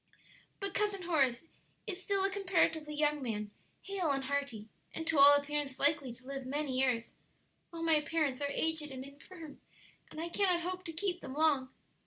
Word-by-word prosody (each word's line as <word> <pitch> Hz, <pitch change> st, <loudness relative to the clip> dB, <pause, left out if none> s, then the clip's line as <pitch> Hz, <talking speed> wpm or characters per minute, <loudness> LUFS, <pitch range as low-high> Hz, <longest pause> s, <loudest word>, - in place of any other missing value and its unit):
"But 395 Hz, 0 st, -2 dB
Cousin 410 Hz, -3 st, 0 dB
Horace 280 Hz, -6 st, +1 dB, 0.4 s
is 385 Hz, -4 st, -5 dB
still 395 Hz, +1 st, 0 dB
a 390 Hz, -, +1 dB
comparatively 335 Hz, -6 st, +1 dB
young 295 Hz, -1 st, +1 dB
man, 210 Hz, -4 st, -3 dB, 0.3 s
hale 390 Hz, -5 st, -2 dB
and 275 Hz, -1 st, 0 dB
hearty, 265 Hz, -6 st, -3 dB, 0.3 s
and 325 Hz, -, -3 dB
to 320 Hz, -3 st, +2 dB
all 285 Hz, +1 st, +10 dB
appearance 285 Hz, -2 st, -2 dB
likely 285 Hz, -3 st, +3 dB
to 255 Hz, +2 st, -12 dB
live 270 Hz, 0 st, -5 dB
many 285 Hz, -1 st, -2 dB
years, 250 Hz, -3 st, +1 dB, 0.6 s
while 335 Hz, -1 st, -6 dB
my 320 Hz, -2 st, +4 dB
parents 300 Hz, -4 st, -1 dB
are 285 Hz, -, 0 dB
aged 315 Hz, +1 st, -1 dB
and 260 Hz, -1 st, -7 dB
infirm, 295 Hz, +2 st, -12 dB, 0.5 s
and -, -, -9 dB
I 330 Hz, -, -2 dB
cannot 365 Hz, -1 st, +2 dB
hope 365 Hz, +1 st, -4 dB
to 330 Hz, -, -4 dB
keep 360 Hz, +2 st, -2 dB
them 260 Hz, -, -7 dB
long." 290 Hz, -4 st, +2 dB
300 Hz, 180 wpm, -33 LUFS, 275-345 Hz, 0.6 s, all